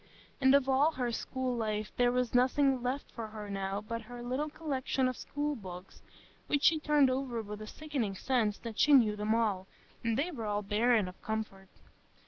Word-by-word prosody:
And 265 Hz, 0 st, +6 dB
of 280 Hz, -2 st, +3 dB
all 275 Hz, +4 st, +3 dB
her 250 Hz, -3 st, -1 dB
school 255 Hz, +1 st, -2 dB
life 215 Hz, -2 st, -2 dB
there 245 Hz, 0 st, +3 dB
was 250 Hz, -1 st, 0 dB
nothing 260 Hz, +1 st, +3 dB
left 255 Hz, +3 st, -3 dB
her 215 Hz, -2 st, -6 dB
now 195 Hz, 0 st, -2 dB
but 230 Hz, +2 st, -5 dB
her 245 Hz, 0 st, -7 dB
little 260 Hz, +5 st, -2 dB
collection 270 Hz, -4 st, -1 dB
of 255 Hz, -, -2 dB
school 290 Hz, +3 st, -3 dB
books, 185 Hz, -5 st, -10 dB, 0.5 s
which 290 Hz, -1 st, 0 dB
she 320 Hz, -1 st, +5 dB
turned 295 Hz, -3 st, +4 dB
over 255 Hz, -3 st, -2 dB
with 210 Hz, 0 st, -7 dB
a 215 Hz, -, -7 dB
sickening 270 Hz, -8 st, -3 dB
sense 220 Hz, -2 st, 0 dB
that 230 Hz, -2 st, -7 dB
she 300 Hz, -, +5 dB
knew 225 Hz, -6 st, +6 dB
them 210 Hz, +1 st, 0 dB
all, 205 Hz, -5 st, 0 dB, 0.4 s
and 230 Hz, -1 st, 0 dB
they 315 Hz, +6 st, 0 dB
were 230 Hz, -9 st, -5 dB
all 205 Hz, 0 st, -1 dB
barren 215 Hz, +1 st, +2 dB
of 180 Hz, -, -11 dB
comfort. 210 Hz, -3 st, -4 dB
240 Hz, 190 wpm, -32 LUFS, 210-270 Hz, 0.5 s, And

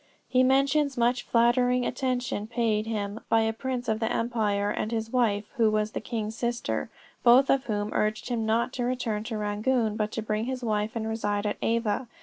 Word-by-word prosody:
He 255 Hz, 0 st, +3 dB
mentions 275 Hz, +2 st, +2 dB
much 240 Hz, +1 st, +2 dB
flattering 245 Hz, +1 st, +2 dB
attention 250 Hz, -4 st, -2 dB
paid 225 Hz, -2 st, 0 dB
him 210 Hz, -1 st, -3 dB
by 225 Hz, -, +4 dB
a 220 Hz, 0 st, +1 dB
prince 250 Hz, +1 st, -4 dB
of 220 Hz, 0 st, 0 dB
the 225 Hz, -, -1 dB
empire 210 Hz, -3 st, 0 dB
and 215 Hz, -, -2 dB
his 225 Hz, -1 st, -2 dB
wife, 215 Hz, -5 st, +2 dB
who 225 Hz, -2 st, +4 dB
was 215 Hz, 0 st, 0 dB
the -, -, -4 dB
king's 220 Hz, -1 st, -4 dB
sister, 240 Hz, 0 st, -2 dB, 0.3 s
both 250 Hz, +3 st, +6 dB
of 270 Hz, 0 st, +2 dB
whom 210 Hz, -1 st, -2 dB
urged 215 Hz, +3 st, -1 dB
him 235 Hz, -2 st, -1 dB
not 225 Hz, +3 st, +1 dB
to 245 Hz, -, -2 dB
return 240 Hz, -4 st, -1 dB
to 225 Hz, -2 st, -3 dB
Rangoon, 215 Hz, +2 st, 0 dB
but 215 Hz, -1 st, -1 dB
to 225 Hz, -, -3 dB
bring 215 Hz, +1 st, -1 dB
his 255 Hz, 0 st, -4 dB
wife 215 Hz, -1 st, -1 dB
and 220 Hz, -1 st, -2 dB
reside 210 Hz, -2 st, -1 dB
at 205 Hz, -, -1 dB
Ava. 230 Hz, +1 st, 0 dB
225 Hz, 195 wpm, -27 LUFS, 215-245 Hz, 0.3 s, both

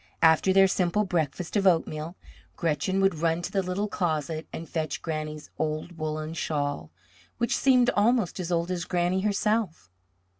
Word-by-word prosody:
After 160 Hz, +3 st, +5 dB
their 195 Hz, 0 st, +6 dB
simple 190 Hz, +2 st, +1 dB
breakfast 170 Hz, 0 st, -2 dB
of 195 Hz, -2 st, +3 dB
oatmeal, 165 Hz, -1 st, +1 dB, 0.4 s
Gretchen 180 Hz, +4 st, 0 dB
would 195 Hz, -5 st, +2 dB
run 165 Hz, +1 st, +1 dB
to -, -, -4 dB
the 195 Hz, -, +1 dB
little 185 Hz, +3 st, -2 dB
closet 160 Hz, -5 st, -2 dB
and 165 Hz, -, -7 dB
fetch 155 Hz, -2 st, -3 dB
Granny's 155 Hz, -2 st, -5 dB
old 155 Hz, +2 st, -3 dB
woollen 155 Hz, 0 st, -3 dB
shawl, 145 Hz, -, -2 dB, 0.5 s
which 235 Hz, 0 st, 0 dB
seemed 250 Hz, -2 st, +4 dB
almost 210 Hz, -3 st, +2 dB
as 180 Hz, -1 st, -3 dB
old 170 Hz, +1 st, 0 dB
as 175 Hz, -2 st, -2 dB
Granny 180 Hz, +1 st, 0 dB
herself. 205 Hz, -, -1 dB
175 Hz, 155 wpm, -27 LUFS, 155-195 Hz, 0.5 s, their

